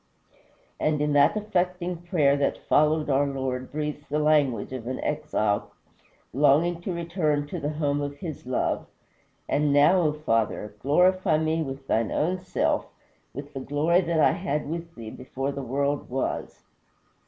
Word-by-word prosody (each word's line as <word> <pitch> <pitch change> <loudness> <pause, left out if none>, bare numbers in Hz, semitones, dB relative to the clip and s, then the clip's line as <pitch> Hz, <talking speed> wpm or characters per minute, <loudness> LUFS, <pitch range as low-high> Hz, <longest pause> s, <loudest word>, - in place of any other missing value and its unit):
And 155 -1 +1
in 150 0 +1
that 145 +7 +4
affecting 180 -4 -1
prayer 165 -5 +2
that 140 -1 -1
followed 155 +1 +3
our 140 0 +2
Lord 130 -2 -3
breathes 150 0 -4
the 150 - 0
language 145 -7 +2
of 120 -3 -6
an 130 - -3
exile 110 -9 -1 0.6
longing 150 +6 +3
to 185 - -3
return 165 -4 -1
to - - -4
the 145 - -2
home 145 -2 -1
of 145 0 -4
his 150 -4 -7
love: 130 - -1 0.6
"And 150 0 +1
now, 145 +6 +5
O 155 -3 +2
Father! 115 -7 -1
glorify 180 - +3
me 160 +1 0
with 135 -2 -5
thine 115 -3 +1
own 180 +4 0
self 185 0 0 0.4
with 140 +2 -8
the 135 - -4
glory 150 +6 +2
that 170 -2 0
I - - +5
had 150 -5 -2
with 165 +2 -5
thee 115 -2 -8
before 135 +2 -4
the 140 - -5
world 140 +3 -1
was." 130 +1 -3
150 Hz, 160 wpm, -26 LUFS, 135-165 Hz, 0.6 s, now